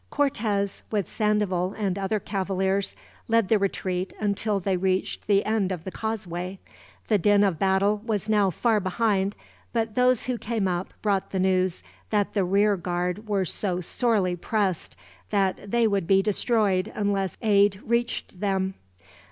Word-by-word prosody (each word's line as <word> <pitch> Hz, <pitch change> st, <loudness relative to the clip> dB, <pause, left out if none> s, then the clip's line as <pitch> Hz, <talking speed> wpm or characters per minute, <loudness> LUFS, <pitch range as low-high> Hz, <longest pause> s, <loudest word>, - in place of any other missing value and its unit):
Cortez, 210 Hz, -8 st, 0 dB
with 205 Hz, -6 st, -1 dB
Sandoval 205 Hz, -4 st, 0 dB
and 200 Hz, -4 st, -1 dB
other 200 Hz, +2 st, -1 dB
cavaliers, 195 Hz, 0 st, -1 dB, 0.3 s
led 230 Hz, -3 st, +2 dB
the 220 Hz, -, +4 dB
retreat 185 Hz, -1 st, -2 dB
until 205 Hz, 0 st, 0 dB
they 190 Hz, 0 st, 0 dB
reached 185 Hz, +1 st, -1 dB
the 200 Hz, -1 st, +3 dB
end 215 Hz, -3 st, +1 dB
of 175 Hz, -3 st, -4 dB
the 190 Hz, -, -6 dB
causeway. 185 Hz, -4 st, -4 dB, 0.5 s
The 210 Hz, -, +3 dB
din 205 Hz, +2 st, +4 dB
of 190 Hz, -6 st, +1 dB
battle 195 Hz, +2 st, +2 dB
was 215 Hz, -3 st, -2 dB
now 210 Hz, -3 st, +3 dB
far 220 Hz, +4 st, +1 dB
behind, 200 Hz, 0 st, 0 dB, 0.4 s
but 225 Hz, -2 st, 0 dB
those 250 Hz, 0 st, +3 dB
who 250 Hz, -2 st, -2 dB
came 220 Hz, -3 st, -1 dB
up 180 Hz, 0 st, -2 dB
brought 200 Hz, -3 st, +1 dB
the 190 Hz, -, -2 dB
news 185 Hz, -1 st, +1 dB, 0.3 s
that 205 Hz, -2 st, 0 dB
the 200 Hz, -, +2 dB
rear 200 Hz, +2 st, +3 dB
guard 180 Hz, +4 st, -3 dB
were 200 Hz, -3 st, +1 dB
so 180 Hz, 0 st, -1 dB
sorely 195 Hz, -1 st, +1 dB
pressed, 190 Hz, -1 st, -1 dB, 0.3 s
that 200 Hz, -1 st, 0 dB
they 235 Hz, +2 st, +3 dB
would 200 Hz, -5 st, +1 dB
be 195 Hz, 0 st, +4 dB
destroyed 210 Hz, -2 st, +1 dB
unless 200 Hz, -3 st, -1 dB
aid 200 Hz, -2 st, +4 dB
reached 235 Hz, -5 st, -1 dB
them. 190 Hz, -1 st, 0 dB
200 Hz, 155 wpm, -25 LUFS, 190-215 Hz, 0.5 s, the